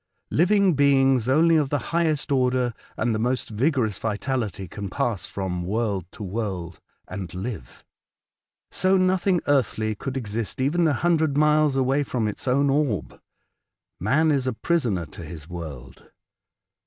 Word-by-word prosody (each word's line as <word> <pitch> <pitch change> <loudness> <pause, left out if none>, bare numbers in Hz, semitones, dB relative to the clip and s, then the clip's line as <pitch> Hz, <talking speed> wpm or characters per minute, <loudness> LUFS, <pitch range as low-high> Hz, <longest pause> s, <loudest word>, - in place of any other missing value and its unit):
Living 190 +2 +4
beings 135 -3 +3
only 165 +5 +4
of 150 -4 +2
the 145 - +1 0.2
highest 160 -3 +1
order 125 -2 +2 0.2
and 120 - 0
the 110 - -1
most 125 +2 -1
vigorous 115 - 0
vitality 110 -3 -2
can 100 +1 -6
pass 110 +1 -2
from 95 -3 -3
world 100 -1 -1
to 110 - -9
world 95 -4 -4 0.3
and 90 -4 -6
live. 95 - -7 0.9
So 190 +1 +3
nothing 185 -1 +2
earthly 110 -6 +1
could 130 +6 -5
exist 115 +1 -4
even 160 +6 +2
a 150 - +2
hundred 160 -1 +1
miles 150 -1 +3
away 135 +2 +2
from 125 -5 -1
its 105 - -5
own 140 +3 +3
orb 135 - -1 0.4
— - - -61
man 155 +3 +4
is 135 -3 +1
a 130 - 0
prisoner 115 - 0
to 75 +3 -11
his 75 -1 -9
world. 80 -8 -9
125 Hz, 150 wpm, -24 LUFS, 105-150 Hz, 0.9 s, Living